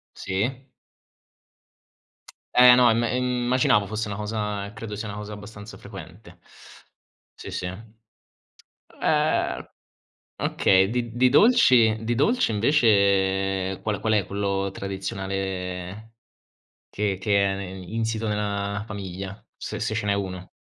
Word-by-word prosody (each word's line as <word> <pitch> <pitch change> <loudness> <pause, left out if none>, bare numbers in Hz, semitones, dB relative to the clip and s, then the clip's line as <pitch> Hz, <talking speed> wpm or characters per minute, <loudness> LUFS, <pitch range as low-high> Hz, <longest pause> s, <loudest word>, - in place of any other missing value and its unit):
Sì. 125 +8 -3 1.9
Eh 125 0 +9
no, 125 -1 +6
im 115 +1 +2
immaginavo 125 -3 +1
fosse 110 0 -3
una 100 - -4
cosa 105 -1 -3
credo 110 -2 -7
sia 110 +1 -5
una 105 - -6
cosa 105 0 -7
abbastanza 105 +1 -10
frequente. - - -12 1.0
Sì, - - -9
sì. 90 - -4 1.1
Ehm, 150 0 -1 0.7
okay. 95 0 +3
Di 120 0 -3
di 125 +1 +4
dolci 130 - +5
di 115 +2 0
dolci, 220 - +2
invece 100 -5 +2
qual 105 -2 -1
qual 110 0 +1
è 105 -3 +2
quello 100 -1 -1
tradizionale 95 +1 -5 0.8
che 100 -2 -1
che 100 -1 +2
è 95 0 -1
insito 110 +5 -3
nella 100 -1 -2
famiglia, 95 -1 -7
se - - -6
se 110 - -1
ce 110 -2 -2
n'è 100 - +2
uno. 95 -2 -4
105 Hz, 115 wpm, -24 LUFS, 95-115 Hz, 1.9 s, Eh